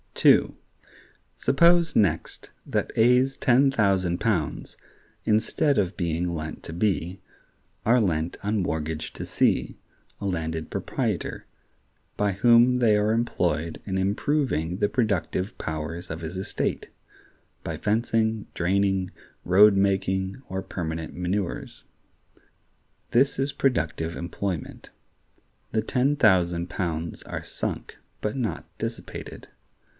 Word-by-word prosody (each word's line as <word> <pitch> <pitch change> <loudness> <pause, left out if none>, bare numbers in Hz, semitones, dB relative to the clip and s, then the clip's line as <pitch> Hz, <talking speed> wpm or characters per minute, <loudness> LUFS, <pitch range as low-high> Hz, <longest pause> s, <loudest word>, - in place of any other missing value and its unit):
(2.) - - +5 0.8
Suppose 170 +3 +4
next 100 -7 0
that - - -1
A's 125 +4 +4
ten 135 +1 +4
thousand 95 -7 +1
pounds, 95 -10 -1 0.5
instead 110 +6 +2
of 95 -1 -1
being 85 -1 -1
lent 80 -1 -5
to - - -6
B, 90 -1 -1 0.7
are 120 +2 +5
lent 85 -4 -1
on 105 0 0
mortgage 80 -2 -3
to - - -6
C, - - +1 0.4
a - - -5
landed 80 -3 -3
proprietor, - - -3 0.7
by 100 -1 +1
whom 120 +4 +5
they 115 -4 +4
are 105 +1 +2
employed 85 -8 -1
in 95 -2 -2
improving 95 - 0
the 105 - +1
productive 100 -4 -1
powers 80 +3 -5
of 80 +1 -5
his 80 +3 -5
estate, 95 - -2 0.7
by - - -4
fencing, 110 0 0
draining, 95 +1 +1 0.3
road 100 +3 +6
making, 95 0 0
or 95 0 -3
permanent 80 -3 -5
manures. 90 +1 -3 1.3
This 135 +3 +3
is 135 +1 0
productive 80 - 0
employment. 90 0 -5 0.8
The 110 - +1
ten 130 +5 +1
thousand 90 -7 +3
pounds 85 -3 -3
are - - -6
sunk, - - -4 0.2
but 105 - -2
not 125 -5 -3
dissipated. - - -6
95 Hz, 115 wpm, -25 LUFS, 85-115 Hz, 1.3 s, road